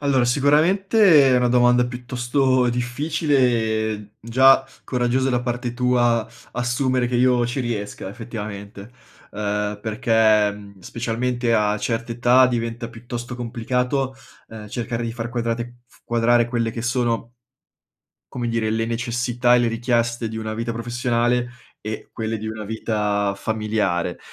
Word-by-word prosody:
Allora, 140 -3 +2
sicuramente 155 - +4
è - - +5
una 125 0 +2
domanda 125 0 +4
piuttosto 125 +1 0
difficile 140 +5 0
e, 110 -3 +1
mhmm, 105 -1 -13
già 130 +4 +5 0.2
coraggiosa 125 +1 0
da 125 -1 +1
parte 120 0 -3
tua, 120 -2 +2 0.3
assumere 125 +1 0
che 125 - -4
io 125 -1 +3
ci 120 +3 -3
riesca, 110 -6 -4
effettivamente, 105 -1 -8 0.4
uhm, 105 0 -2
perché 110 -1 +3
mhmm, 100 -1 -13
specialmente 120 +3 -1
a 105 -1 +1
certe 115 +2 -2
età 125 +2 +5
diventa 115 -1 -3
piuttosto 120 +1 -7
complicato, 125 +3 -1 0.3
uhm, 110 -1 -9
cercare 115 +1 -3
di 115 -1 -3
far 115 0 -5
quadrate 120 0 -3
f - - -25
quadrare 120 0 +2
quelle 120 -1 -1
che 115 0 -6
sono 120 -1 -1 1.0
come 120 -1 -3
dire, 115 -2 0
le 115 +1 0
necessità 120 +1 +1
e - - +5
le 120 -1 +2
richieste 115 0 0
di 110 - -6
una 110 -1 -4
vita 115 +1 -3
professionale 120 +1 0 0.3
e 110 0 -6
quelle 110 0 -3
di 110 +1 -5
una 110 -1 -6
vita 105 -2 -1
familiare, 105 -5 -1
120 Hz, 140 wpm, -22 LUFS, 110-125 Hz, 1.0 s, è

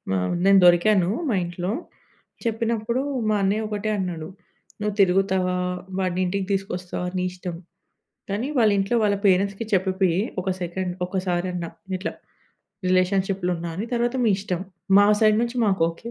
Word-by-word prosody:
ఆహ్, 90 - 0
హ్మ్, - - -1
నేను 195 0 +7
దొరికాను 175 +1 +5 0.2
మా 225 - +2
ఇంట్లో. 175 +2 -3 0.7
చెప్పినప్పుడూ 230 +1 0 0.3
మా 215 - +3
అన్నయ్య 205 +3 +1
ఒకటే 210 0 -3
అన్నాడు. 175 -5 -3 0.5
"నువ్వు 210 0 -1
తిరుగుతావా, 190 -1 +2 0.4
వాడినింటికి 185 +1 0
తీసుకొస్తావా 185 -2 -3
నీ 180 - 0
ఇష్టం, 180 -1 -6 0.8
కానీ 210 +6 -1
వాళ్ళింట్లో 205 0 +3
వాళ్ళ 205 -1 +2
పేరెంట్స్‌కి 195 +3 +2
చెప్పిపియ్యి 190 -2 +2 0.2
ఒక 190 +1 -2
సెకండ్ 180 +1 -3
ఒకసారన్న, 180 -1 -2 0.3
ఇట్లా 185 - -4 0.8
రిలేషన్‌షిప్‌లో 185 0 +1
ఉన్న 170 +1 -6
అని. 200 +7 -4
తర్వాత 240 +1 0
మీ 225 - +4
ఇష్టం. 185 -3 -3 0.4
మా 205 - +7 0.2
సైడ్ 215 -1 +5
నుంచి 240 +1 -3
మాకోకే" 190 +2 0
190 Hz, 135 wpm, -24 LUFS, 180-210 Hz, 0.8 s, నేను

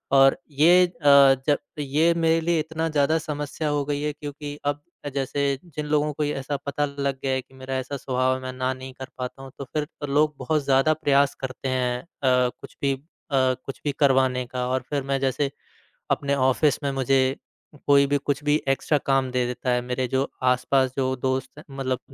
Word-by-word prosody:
और 135 0 +6
ये 175 +6 +6
अ, 140 -5 +6
जब 145 - +4 0.2
ये 150 +4 +2
मेरे 165 0 +2
लिए 165 0 +1
इतना 160 +1 -2
ज़्यादा 155 +1 +2
समस्या 150 0 -3
हो 145 -1 0
गई 145 0 -2
है 150 0 -1
क्योंकि 145 0 -7
अब 145 0 -1 0.2
अ, 145 - -2
जैसे 140 +1 -1 0.2
जिन 150 -3 -6
लोगों 150 0 +1
को 150 - -2
ये 145 0 -1
ऐसा 135 +1 -3
पता 145 +1 0
लग 140 -1 -3
गया 135 - 0
है 130 - 0
कि 130 - -26
मेरा 130 0 -5
ऐसा 130 +2 -4
स्वभाव 130 -1 0
है 130 - -6
मैं 130 0 -5
ना 130 0 -1
नहीं 130 0 -9
कर 130 - -6
पाता 125 +1 -5
हूँ 135 - -10
तो 140 - -6
फिर 150 -1 0 0.2
तो 145 - -3
लोग 150 +2 +2
बहुत 145 +3 0
ज़्यादा 135 +3 +3
प्रयास 140 -3 +2
करते 130 0 -4
हैं 125 -1 0
अ, - - -23 0.2
कुछ 125 -1 0
भी 140 -1 +2
अ, - - -5 0.4
कुछ 130 0 0
भी 145 - +2
करवाने 130 -2 +3
का 125 0 -3
और 130 0 0
फिर 145 -2 -1
मैं 135 0 -1
जैसे 135 +1 0 0.6
अपने 140 0 +1
ऑफ़िस 135 +3 +2
में 140 - 0
मुझे 135 0 +2 0.5
कोई 140 -1 +6
भी 145 - +4
कुछ 145 +1 -2
भी 145 0 +3
एक्स्ट्रा 135 +2 +2
काम 135 -1 +2
दे 125 -1 +1
देता 125 +1 -3
है 125 0 +2
मेरे 125 +1 -2
जो 130 +3 0 0.2
आस-पास 130 +1 +2
जो 130 -1 +1
दोस्त 130 +1 -1
हैं 150 - -10
मतलब 130 -2 -1
140 Hz, 210 wpm, -24 LUFS, 130-145 Hz, 0.6 s, और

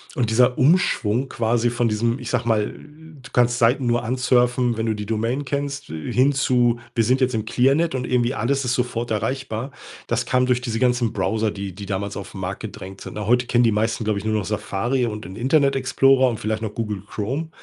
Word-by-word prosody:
und 120 -4 0
dieser 125 +2 +3
Umschwung, 135 - +2
quasi 120 0 0
von 120 0 0
diesem, 115 +4 0
ich 125 - -6
sage 120 -2 -1
mal, 110 -2 +1
du 150 -3 -15
kannst 120 -2 +3
Seiten 125 +2 +3
nur 120 0 +1
ansurfen, 125 -1 +2
wenn 110 - -1
du 110 - +1
die 105 -1 -5
Domain 115 +6 -1
kennst, 140 +1 -3
hin 125 - +1
zu, 125 -3 +2
wir 115 - +2
sind 130 +4 +2
jetzt 130 -2 +1
im 110 - -1
Clearnet 135 +8 +2
und 125 -1 -3
irgendwie 125 0 +1
alles 135 +3 0
ist 120 -1 0
sofort 120 -2 -2
erreichbar. 120 +3 -2 0.4
Das 120 0 0
kam 125 +2 +2
durch 125 -1 +1
diese 115 -2 -3
ganzen 120 -2 +2
Browser, 110 -1 0
die 100 -2 -6
die 100 +1 -8
damals 100 +1 -3
auf - - -7
'n - - -8
Markt - - -4
gedrängt 95 +1 -8
sind. - - -8
Na, 105 - -4
heute 125 +1 +3
kennen 120 0 +3
die 115 - +4
meisten, 110 +2 0
glaube 105 -1 0
ich, 100 - -9
nur 110 0 0
noch 105 -3 -1
Safari 105 +5 -1
und 105 -3 -6
den 95 +2 -9
Internet 135 +4 +2
Explorer 135 0 +3
und 115 - -4
vielleicht 110 +1 -2
noch 110 -2 -4
Google 105 -4 -3
Chrome. 135 +12 -3
120 Hz, 220 wpm, -22 LUFS, 110-130 Hz, 0.4 s, die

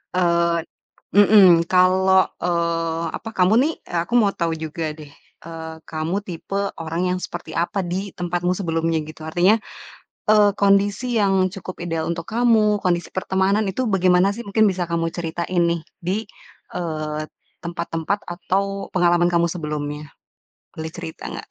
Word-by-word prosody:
Eee 170 -1 +2 0.5
mmm, 190 -5 +7
kalau, 185 +1 +4 0.2
eee, 170 -1 0
apa 225 - -8
kamu 185 +3 +4
nih 315 +4 +1 0.3
aku 235 - -8
mau 210 -4 +4
tau 165 -1 -1
juga 160 0 -4
deh, 150 -2 -11 0.4
eee, 160 -1 -7
kamu 165 +5 -2
tipe 185 +3 -5 0.2
orang 165 +2 -3
yang - - -1
seperti - - -8
apa, 190 +4 0
di 185 +3 -3
tempatmu 175 0 -1
sebelumnya 165 -3 0
gitu. 155 0 -11
Artinya, 180 +7 +3 0.7
eee, 210 -1 +6
kondisi 200 +4 +2
yang 195 -2 +3
cukup 185 -1 -8
ideal 165 -2 -2
untuk 165 -1 -4
kamu, 220 -3 +3
kondisi 175 -1 +1
pertemanan 190 +2 +1
itu 255 +4 -2
bagaimana 185 0 +3
sih? 235 - -6
Mungkin 215 +1 +3
bisa 180 -1 -2
kamu 165 0 0
ceritain 175 +1 -1
nih, 170 0 0 0.2
di, 185 +4 -1 0.6
eee, 155 -3 -3 0.4
tempat-tempat 170 +2 -2
atau 195 +3 -2
pengalaman 175 -1 +3
kamu 170 0 +3
sebelumnya. 150 -3 -5 0.6
Boleh 160 0 -5
cerita 160 - -7
gak? - - -8
175 Hz, 140 wpm, -22 LUFS, 165-195 Hz, 0.7 s, mmm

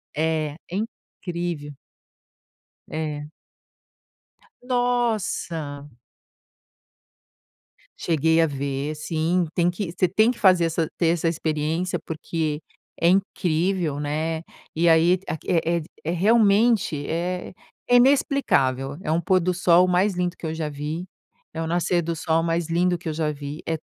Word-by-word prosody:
É, 155 -1 0 0.2
é - - -3
incrível. 175 - -5 1.1
É. 150 -2 -4 1.4
Nossa. 220 - -1 2.1
Cheguei 160 0 +2
a - - +5
ver, 140 +1 -3
sim, 165 +3 0
tem 175 0 +3
que 175 -1 -4
você 185 +1 +1
tem 215 +6 +3
que 245 - -2
fazer 185 -3 +5
essa 165 0 0
ter 170 - +3
essa 165 0 +1
experiência 160 +2 -1
porque, 155 -1 -3 0.4
é 170 - +5
incrível, 180 -4 0
né. 155 +2 -2 0.3
E 170 +2 +2
aí, 170 +2 +5 0.3
é 170 0 +1 0.2
é 165 - 0
realmente 205 -4 +3
é 180 +3 -3 0.4
é 245 - +5
inexplicável, 195 - +3
é 155 - -2
um 160 - +2
pôr 185 +2 +2
do 180 +1 0
sol 180 0 +4
mais 185 +3 +2
lindo 180 0 -2
que - - -8
eu 160 - -2
já 160 -2 -3
vi, 150 +5 -5 0.5
é 160 - -5
o - - -2
nascer 175 +1 +1
do 165 +1 -2
sol 165 0 +1
mais 165 0 0
lindo 175 +1 +1
que 170 - -5
eu - - -2
já 155 -1 -1
vi, 145 +1 -7
é 165 - 0
165 Hz, 135 wpm, -24 LUFS, 155-180 Hz, 2.1 s, a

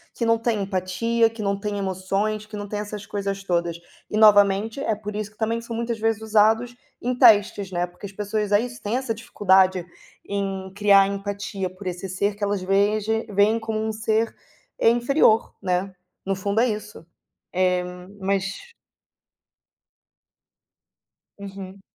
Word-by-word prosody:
que 235 - -1
não 230 0 +4
tem 230 -2 0
empatia, 195 +5 +1
que 225 0 -9
não 200 0 0
tem 205 0 -3
emoções, 195 +2 -2
que 210 0 -8
não 205 0 -5
tem 205 +1 -4
essas 210 -1 -6
coisas 200 -1 -4
todas. 170 -2 -1 0.3
E 215 - -2
novamente, 205 +2 +5
é 225 - 0
por 210 0 -7
isso 210 -1 -4
que 210 - -29
também 225 +1 -1
são 230 0 -6
muitas 230 -1 -2
vezes 225 -1 0
usados 220 +3 +2 0.3
em 250 +1 -1
testes, 205 -5 +4
né, 175 -1 0
porque 180 +3 -12
as - - -12
pessoas 210 +1 -2
é 205 - +5
isso 240 +1 -5
têm 215 +4 -1
essa 260 -3 -2
dificuldade 190 -4 +2 0.4
em 195 -1 -3
criar 200 -1 +5
empatia 200 -1 -4
por 185 +2 -13
esse 180 +2 -4
ser 200 +2 -1
que 205 - -7
elas 200 -1 0
vejem 210 +3 +1
veem 205 +3 +3
como 225 -1 -3
um 220 0 -1
ser, 220 +1 0 0.4
é - - +5
inferior, 240 -1 +3
né, 185 0 -1 0.3
no 195 0 0
fundo 200 +3 -1
é 250 - +3
isso. 210 -5 -5 0.5
Eh, 180 0 +2 0.4
mas 195 - -2 2.7
Uhum. 195 -1 -9
205 Hz, 160 wpm, -23 LUFS, 195-220 Hz, 2.7 s, novamente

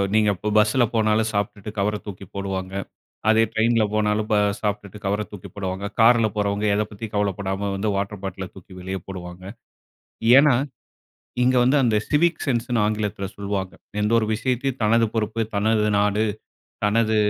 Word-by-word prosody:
நீங்க 105 -1 +4
இப்போ 105 +4 -3
பஸ்ஸில 110 +4 +4
போனாலும், 110 0 +2
சாப்ட்டுட்டு 100 0 -2
கவர 105 +2 +1
தூக்கி 100 -1 -8
போடுவாங்க. 95 -1 -4 0.6
அதே 110 +1 +5
ட்ரெயினில 115 0 +3
போனாலும், 105 0 +1 0.3
சாப்பிட்டுட்டு 105 -1 -3
கவர 100 +2 0
தூக்கி 100 -3 -9
போடுவாங்க. 95 0 -4
காரில 115 -1 +6
போறவங்க 105 0 0
எதை 105 - +2
பத்தியும் 110 +1 -8
கவலைப்படாம 100 0 -1
வந்து 105 +2 -1
வாட்டர் 100 0 -3
பாட்டில 95 -1 -5
தூக்கி 95 0 -13
வெளியே 95 +1 -4
போடுவாங்க. 90 -1 -8 0.9
ஏன்னா, 140 -3 +6 0.9
இங்க 130 +1 +3
வந்து 135 +4 +3
அந்த 110 -3 +2
சிவிக் 165 +2 +2
சென்ஸ்ன்னு 120 -2 0
ஆங்கிலத்தில 105 -2 -2
சொல்லுவாங்க. 100 -2 -3 0.3
எந்த 105 +2 +1
ஒரு 110 - 0
விஷயத்தையும் 130 +2 -1
தனது 115 +2 +4
பொறுப்பு, 110 +1 -1
தனது 105 +1 +2
நாடு, 105 +1 +2 0.6
தனது 110 +1 +2
105 Hz, 145 wpm, -23 LUFS, 100-110 Hz, 0.9 s, காரில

